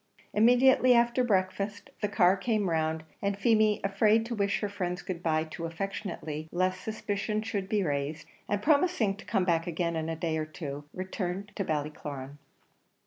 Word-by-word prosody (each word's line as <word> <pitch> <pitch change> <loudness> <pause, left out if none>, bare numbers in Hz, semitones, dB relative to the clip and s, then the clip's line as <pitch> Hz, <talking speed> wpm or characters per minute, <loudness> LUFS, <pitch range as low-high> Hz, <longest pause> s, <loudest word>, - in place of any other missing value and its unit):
Immediately 250 +3 +5
after 235 +1 +3
breakfast 200 -1 -1
the 210 - +1
car 190 -2 +4
came 205 -2 0
round, 160 0 0 0.2
and 200 0 0
Feemy, 215 0 +3
afraid 210 +3 +3
to 235 - -4
wish 200 -3 0
her 205 - 0
friends 180 -3 -3
good 180 -2 -5
bye 155 -2 +1
too 160 +1 -6
affectionately 165 -3 -5
lest 185 +1 0
suspicion 215 0 -2
should 200 -3 -3
be 210 -2 +2
raised, 145 0 -2 0.2
and 205 0 0
promising 290 - +3
to 205 - -12
come 185 - +1
back 165 -2 +1
again 170 0 -1
in 160 0 -2
a 165 - -2
day 160 -1 -1
or 155 - -1
two, 145 -2 -6
returned 190 +1 -4
to 200 - -1
Ballycloran. 145 -3 -4
195 Hz, 170 wpm, -29 LUFS, 160-210 Hz, 0.2 s, Immediately